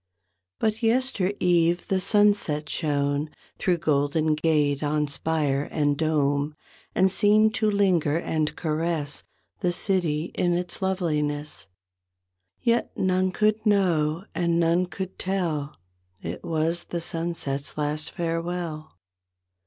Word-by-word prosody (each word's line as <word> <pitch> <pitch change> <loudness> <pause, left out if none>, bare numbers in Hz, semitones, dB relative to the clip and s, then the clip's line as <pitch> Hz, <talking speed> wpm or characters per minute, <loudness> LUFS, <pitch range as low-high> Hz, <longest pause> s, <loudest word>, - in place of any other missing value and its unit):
But 220 +1 -1
yester 230 -4 +2
eve 175 -1 +2
the 190 - +1
sunset 195 -6 +2
shone 145 -1 -1 0.3
Thro' 180 -4 +1
Golden 155 +1 +1
Gate 150 -2 +1
on 150 0 +1
spire 145 -1 0
and 145 -2 +1
dome 145 -1 0 0.4
And 190 0 +4
seemed 215 +2 +4
to 220 -3 +1
linger 180 -7 +2
and 155 -2 -1
caress 155 -2 -1 0.4
The 180 -2 +1
city 175 -4 0
in 175 -1 +1
its 175 +2 -2
loveliness. 150 - -2 1.0
Yet 235 0 +2
none 185 0 +1
could 215 +3 +1
know 175 -5 +2
and 170 -1 +1
none 170 +2 +2
could 190 0 -7
tell 165 -7 -2 0.4
It 85 -1 -6
was 165 +1 -1
the 170 - -4
sunset's 165 -5 -2
last 150 +1 -1
farewell. 165 -2 -3
165 Hz, 115 wpm, -25 LUFS, 150-185 Hz, 1.0 s, And